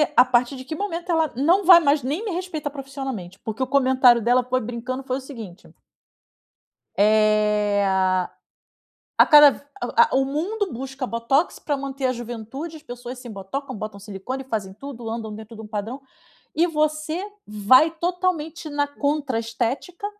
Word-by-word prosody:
a 245 - +8
partir 250 +1 +1
de 260 - -8
que 315 +4 -6
momento 350 -2 -3
ela 320 -3 +1
não 340 +10 +3
vai 350 -1 +10
mais 290 -2 +2
nem 295 - -2
me 430 - -3
respeitar 345 -4 -4
profissionalmente?", 270 -9 -7
porque 220 +4 -4
o - - -2
comentário 260 -3 +4
dela 245 +3 +3
foi 255 0 0
brincando, 245 +3 -5
foi 260 -1 -2
o - - -7
seguinte. 230 -10 -10 1.3
Eh, 210 -1 +3
ah, 185 -1 +1 0.9
a - - +8
cada 295 -2 +9
v - - -11 0.2
o - - -4
a 470 0 +6
o 270 0 +3
mundo 365 +8 -2
busca 265 +2 -5
botox 250 +8 0
pra 290 - -2
manter 275 -1 -3
a 255 - +1
juventude, 240 +7 -7
as 305 - -13
pessoas 245 -2 -8
se 250 - -10
embotocam, 215 +7 -6
botam 215 -1 -7
silicone, 210 +6 -6
fazem 215 -7 -4
tudo, 240 -1 -8
andam 220 -2 -5
dentro 220 +1 -10
de 220 - -9
um - - -9
padrão 215 +5 -5 0.5
e 335 +2 +3
você 310 +1 -1 0.2
vai 215 +9 +5
totalmente 335 -2 -2
na 290 0 0
contra 285 -3 -1
estética 245 - -3
260 Hz, 170 wpm, -23 LUFS, 225-300 Hz, 1.3 s, vai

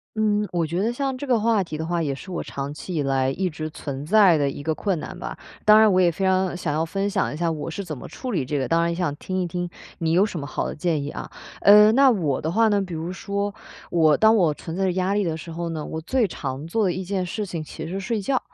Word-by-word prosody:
嗯， 210 -1 +1
我 175 -1 0
觉 170 +3 -2
得 225 +4 0
像 270 0 -2
这 285 - -5
个 245 -5 +2
话 220 -2 +2
题 165 -3 -7
的 160 - -3
话， 170 -1 0
也 140 - -1
是 140 +8 -10
我 180 - -3
长 140 +1 -5
期 170 +5 -7
以 155 - 0
来 135 -1 +1
一 185 +6 -1
直 155 0 -5
存 140 -1 -6
在 195 -3 +6
的 145 - +1
一 140 - -4
个 160 +2 -1
困 190 -3 -1
难 - - -7
吧。 - - -6 0.3
当 215 0 +8
然 220 -1 +6
我 185 - +3
也 175 -2 +4
非 180 +4 -4
常 185 -1 +2
想 165 -4 -2
要 160 +2 0
分 195 +4 -2
享 195 -6 0
一 - - -6
下 170 0 0
我 160 +1 -4
是 200 - -4
怎 160 -6 -6
么 - - -9
处 255 -2 -6
理 155 -10 0
这 145 +1 -1
个， 130 - -1
当 165 - +2
然 170 0 +1
也 - - -2
想 170 -5 -1
听 185 +4 -3
一 180 - -1
听 175 +1 -3 0.3
你 160 -1 -1
有 180 +4 +5
什 205 -5 -2
么 140 - -5
好 130 - -3
的 - - -5
建 155 -2 0
议 145 - -4
啊。 - - -6 0.3
嗯， 210 +2 +8
那 275 -1 +6
我 160 - 0
的 160 - -2
话 225 +4 +4
呢， 205 -1 +3
比 190 -3 -4
如 165 +2 -4
说， 200 +1 -3 0.3
我 160 -3 +4
当 220 +5 +5
我 170 -7 +3
存 165 +3 -7
在 195 - 0
着 185 - +2
压 185 +2 0
力 205 - +2
的 165 -3 -1
时 160 +1 -9
候 170 +1 -4
呢， 160 -2 -4
我 160 - -5
最 230 +6 +1
常 140 -2 -5
做 220 +6 0
的 180 - +1
一 185 - -4
件 185 0 -2
事 210 +4 -3
情 170 -5 -4
其 155 +1 -8
实 170 - -6
是 195 - -2
睡 215 +2 -2
觉。 255 +6 +1
175 Hz, 320 characters per minute, -24 LUFS, 155-200 Hz, 0.3 s, 当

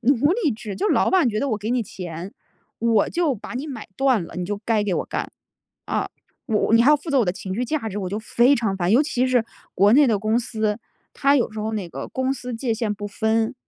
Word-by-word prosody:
奴 275 +5 +3
隶 390 -7 +1
制。 215 -3 -5
就 420 - 0
是 - - +3
老 - - +2
板 365 -9 +4
觉 215 -1 -1
得 280 - 0
我 215 - -1
给 215 +2 -4
你 245 -1 +1
钱， 180 -1 -7 0.5
我 230 -3 +2
就 335 -6 0
把 225 +2 -9
你 275 +5 -4
买 250 -7 -7
断 260 -7 +2
了， - - -12
你 180 - -2
就 205 +3 -3
该 220 -2 +2
给 195 - 0
我 - - -1
干， - - -4 0.6
啊。 - - -1 0.4
我 220 -1 +2
你 230 - +6
还 275 - +6
要 300 - +6
负 295 +4 -12
责 280 -3 +3
我 235 - +3
的 180 - 0
情 185 0 -6
绪 245 - -1
价 265 -3 -2
值， 205 - -7
我 190 - -3
就 200 +4 -3
非 240 +5 +3
常 220 -6 -1
烦， 180 +1 +1
尤 255 - +6
其 255 -4 0
是 250 -3 +3 0.3
国 200 +4 +5
内 290 +1 +6
的 215 -4 +2
公 215 +3 +1
司， 220 -2 -1 0.4
它 280 +1 +3
有 240 - +1
时 215 - -8
候 220 +1 -2
那 200 -5 -3
个 135 -4 -6
公 260 +1 -1
私 250 -1 -6
界 230 0 -1
限 220 -2 -1
不 205 0 -6
分， 220 +4 0
225 Hz, 280 characters per minute, -23 LUFS, 205-260 Hz, 0.6 s, 你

